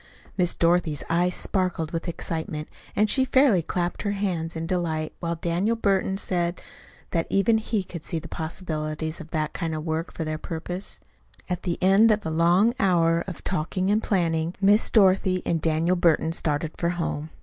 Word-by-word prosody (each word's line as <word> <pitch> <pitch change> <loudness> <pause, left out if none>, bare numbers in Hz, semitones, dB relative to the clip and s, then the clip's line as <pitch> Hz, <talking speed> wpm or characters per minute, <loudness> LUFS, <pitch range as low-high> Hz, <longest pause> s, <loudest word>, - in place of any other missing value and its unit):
Miss 180 -3 +1
Dorothy's 170 -3 +1
eyes 180 +2 +2
sparkled 180 -5 -1
with 165 +1 -4
excitement, 160 -2 -4 0.3
and 210 - +3
she 260 +5 +3
fairly 260 -8 +4
clapped 175 +2 -2
her 205 -1 -1
hands 175 -5 -2
in 160 - -3
her - - -4
delight, 165 -4 -1
while 170 -1 -2
Daniel 175 +7 0
Burton 195 -3 +1
said 175 -2 -1 0.5
that 165 -1 0
even 210 +3 +3
he 220 -2 -1
could 170 -3 -8
see 165 - -3
the 165 +1 -6
possibilities 160 -1 -4
of 160 - -11
that 155 -1 -2
kind 165 -3 -3
of 155 0 -5
work 160 +1 -2
for 165 - -4
their 155 0 -3
purpose. 175 +4 -5 0.5
At 180 -1 -2
the 175 -2 -2
end 195 +4 +6
of 210 -1 +1
a 160 - -2
long 175 +8 +4
hour 170 -4 +3
of 185 - -7
talking 185 +2 -1
and 215 +1 +2
planning, 170 -4 0
Miss 205 +2 +4
Dorothy 190 -3 +3
and 165 -2 0
Daniel 165 +3 +2
Burton 165 -2 +2
started 155 -1 -1
for 170 - +1
home. 160 -3 -3
170 Hz, 180 wpm, -25 LUFS, 160-190 Hz, 0.5 s, end